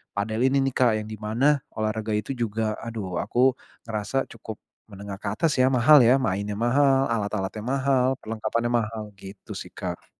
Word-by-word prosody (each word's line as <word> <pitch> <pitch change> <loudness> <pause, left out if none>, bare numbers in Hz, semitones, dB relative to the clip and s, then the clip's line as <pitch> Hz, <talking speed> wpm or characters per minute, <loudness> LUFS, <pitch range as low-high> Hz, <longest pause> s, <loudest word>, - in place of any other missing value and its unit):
padel 110 +2 -2
ini 135 0 +2
nih, 135 - -1
Kak, 125 -3 +4
yang 105 0 -5
di 110 - -6
mana 130 +7 +2 0.2
olahraga 110 0 -2
itu 105 +5 -2
juga, 110 -2 -2
aduh, 105 -6 -5
aku 125 +1 +2 0.3
ngerasa 115 +4 -2
cukup 110 -1 -8 0.3
menengah 100 -1 -8
ke 100 - -5
atas 165 +4 +1
ya, 130 - +5
mahal 135 +3 +6
ya, 120 +3 +6
mainnya 100 -4 -2
mahal, 135 +3 +3
alat-alatnya 105 -1 -2
mahal, 130 -1 +2 0.2
perlengkapannya 115 +2 -2
mahal, 110 -2 -1 0.2
gitu 95 0 -11
sih, - - -7
Kak. - - -6
115 Hz, 170 wpm, -25 LUFS, 105-130 Hz, 0.3 s, mahal